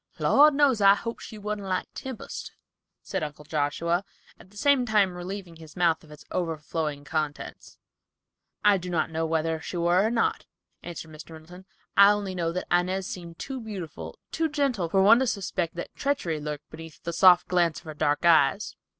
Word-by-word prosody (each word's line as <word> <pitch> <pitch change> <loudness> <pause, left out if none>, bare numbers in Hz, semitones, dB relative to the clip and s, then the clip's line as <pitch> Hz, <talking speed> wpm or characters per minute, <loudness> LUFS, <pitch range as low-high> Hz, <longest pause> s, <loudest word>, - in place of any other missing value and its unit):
"Lord 295 0 +5
knows, 275 -6 +3
I 195 0 +7
hope 230 +3 -5
she 220 - -9
wan't 210 0 -4
like 185 -2 -2
Tempest," 260 -4 -7 0.5
said 190 - -3
Uncle 150 -1 -6
Joshua, 160 +4 0 0.4
at - - -16
the 205 - -17
same 280 +1 +3
time 210 -5 +2
relieving 180 -1 -7
his 160 -2 -13
mouth 170 -3 +2
of 155 - -17
its 150 -1 -13
overflowing 155 -3 -3
contents. 150 -1 -4 0.9
"I 205 -2 +5
do 180 +1 -7
not 170 -2 -1
know 160 0 -1
whether 160 0 -1
she 180 - -5
were 175 +2 +3
or 220 - +2
not," 230 0 0 0.3
answered 165 -2 -8
Mr. 155 +1 -11
Middleton, 175 +4 -13 0.3
"I 200 0 +8
only 200 -2 -3
know 170 -2 -1
that 180 +2 -4
Inez 185 +2 +1
seemed 170 -2 -8
too 265 -2 -6
beautiful, 195 -8 -7
too 325 0 0
gentle, 270 - 0
for 190 +2 +3
one 225 +4 +7
to 265 - +1
suspect 185 -5 -2
that 175 - -6
treachery 225 - -1
lurked 150 0 -6
beneath 160 0 -11
the 170 - -4
soft 180 +1 +6
glance 175 -3 +2
of 175 - -11
her 155 - -7
dark 150 +1 0
eyes. 165 +3 +3
175 Hz, 185 wpm, -26 LUFS, 160-205 Hz, 0.9 s, I